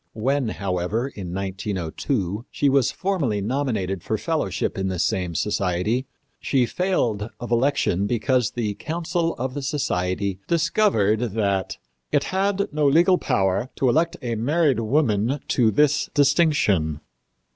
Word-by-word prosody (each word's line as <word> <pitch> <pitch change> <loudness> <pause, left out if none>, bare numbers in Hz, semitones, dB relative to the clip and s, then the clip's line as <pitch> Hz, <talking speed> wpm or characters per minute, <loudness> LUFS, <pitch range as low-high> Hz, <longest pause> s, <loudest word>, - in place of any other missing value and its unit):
When, 130 +4 0
however, 100 +5 -2
in 95 -8 -7
1902, 95 - -3
she 145 - +1
was 135 -2 +3
formally 165 - -1
nominated 105 -5 -1
for - - -2
fellowship - - -1
in 95 0 -2
this 90 -3 -1
same 90 -3 -1
society, 100 - 0 0.3
she 130 -3 +1
failed 120 - -1
of 120 -1 -7
election 120 -6 +1
because 120 +1 +1
the 110 -4 -2
council 165 - -2
of 130 +1 -3
the 145 - -4
society 100 - -1
discovered 155 - +2 0.2
that 100 -4 0 0.3
"it - - +2
had 200 +1 +1
no 150 -1 +2
legal 170 +6 +4
power 95 +5 0
to 130 - +2
elect 165 +6 +1
a 120 -1 -2
married 140 +4 +1
woman 115 0 +1
to 120 -4 +3
this 150 +5 +2
distinction." 140 - +2
120 Hz, 135 wpm, -23 LUFS, 100-145 Hz, 0.3 s, legal